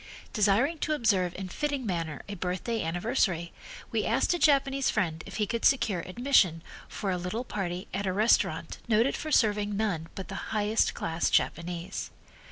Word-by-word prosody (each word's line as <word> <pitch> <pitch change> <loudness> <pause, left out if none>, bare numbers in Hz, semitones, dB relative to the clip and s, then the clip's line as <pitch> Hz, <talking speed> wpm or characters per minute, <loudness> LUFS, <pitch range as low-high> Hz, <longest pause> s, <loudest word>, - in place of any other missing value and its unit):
Desiring 225 +10 +2
to 310 - 0
observe 195 - +1
in 190 0 -5
fitting 285 +6 -2
manner 165 -6 -3
a 205 - -5
birthday 185 +5 -2
anniversary, 175 -1 0 0.4
we - - 0
asked - - +2
a 350 - -1
Japanese 275 -3 +3
friend 165 -7 -1
if - - -8
he 210 - +1
could 230 +3 -3
secure 225 -9 +3
admission 185 - +2 0.2
for 195 - -3
a 180 - -1
little 180 +7 -3
party 185 -6 -4
at 195 +1 -2
a - - +1
restaurant 215 +5 +1
noted 230 +3 +3
for 310 - -5
serving 210 -5 +2
none 185 -7 -1
but 190 - -6
the - - -6
highest 215 0 +1
class 165 +1 -1
Japanese. 175 +2 -1
205 Hz, 170 wpm, -28 LUFS, 180-235 Hz, 0.4 s, Japanese